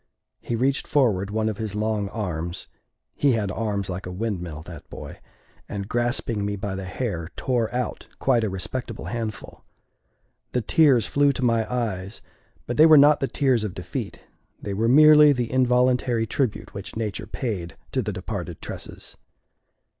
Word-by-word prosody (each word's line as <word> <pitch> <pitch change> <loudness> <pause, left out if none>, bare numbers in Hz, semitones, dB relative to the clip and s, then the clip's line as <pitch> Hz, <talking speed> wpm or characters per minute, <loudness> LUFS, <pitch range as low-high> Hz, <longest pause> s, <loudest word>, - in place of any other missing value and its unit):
He 120 - -3
reached 135 +4 0
forward 105 -9 +2
one 110 +1 0
of 110 -1 -3
his 110 -2 -4
long 105 -1 -1
arms 90 -5 -4 0.5
he 140 -3 +2
had 105 -4 -1
arms 100 -2 -2
like 90 0 -5
a - - -5
windmill, 90 -6 -4
that 85 -2 -11
boy - - -9 0.5
and, 100 -1 -4
grasping 120 -2 -1
me 100 0 -1
by 100 0 -4
the 95 0 -5
hair, 90 -4 -3
tore 120 -4 0
out 125 0 -3
quite 125 -4 +2
a 110 - 0
respectable 95 +7 -5
handful. 110 -3 -5 0.9
The 125 - +1
tears 135 -1 +4
flew 145 0 +3
to 130 0 -1
my 115 -1 +1
eyes, 105 -5 -3 0.4
but 120 - -3
they 155 +2 +8
were 155 -1 +8
not 145 +1 +7
the 135 - 0
tears 130 -6 +1
of 105 -3 -4
defeat; 90 - -5 0.4
they 100 - -4
were 110 +4 +1
merely 150 +2 +8
the 120 -3 -2
involuntary 125 -2 +2
tribute 120 0 -2
which 100 -1 -7
nature 110 -1 -3
paid 100 -8 -4
to - - 0
the - - -3
departed - - -5
tresses. - - -8
110 Hz, 165 wpm, -24 LUFS, 100-125 Hz, 0.9 s, they